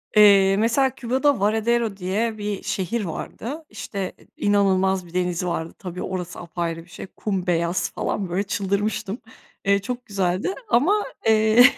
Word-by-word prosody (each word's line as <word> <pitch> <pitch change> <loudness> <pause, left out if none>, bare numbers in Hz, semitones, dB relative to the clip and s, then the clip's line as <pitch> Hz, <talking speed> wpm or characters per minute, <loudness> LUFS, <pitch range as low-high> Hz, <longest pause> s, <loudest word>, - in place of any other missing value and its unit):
Eee, 200 -2 +7
mesela 235 +5 +3
Küba'da 260 +2 +1
Varedero 220 +1 +1
diye 215 +4 -1
bir 205 -1 -3
şehir 210 +4 -1
vardı, 270 - -6
işte, 195 -2 -5 0.2
inanılmaz 190 -2 +2
bir 170 - -15
denizi 180 0 0
vardı. 165 -1 -2
Tabii 180 -2 -6
orası 180 -1 -4
apayrı 170 -1 -4
bir - - -23
şey, 180 - -8
kum 190 -2 -3
beyaz 170 +1 +1
falan, 195 -3 -2
böyle, 185 +4 0
çıldırmıştım, 200 +1 -1 0.5
eee, 200 0 +4
çok 245 +4 -5
güzeldi 195 - 0
ama, 385 - +3 0.2
eee, 220 +1 +6
200 Hz, 145 wpm, -23 LUFS, 180-225 Hz, 0.5 s, Eee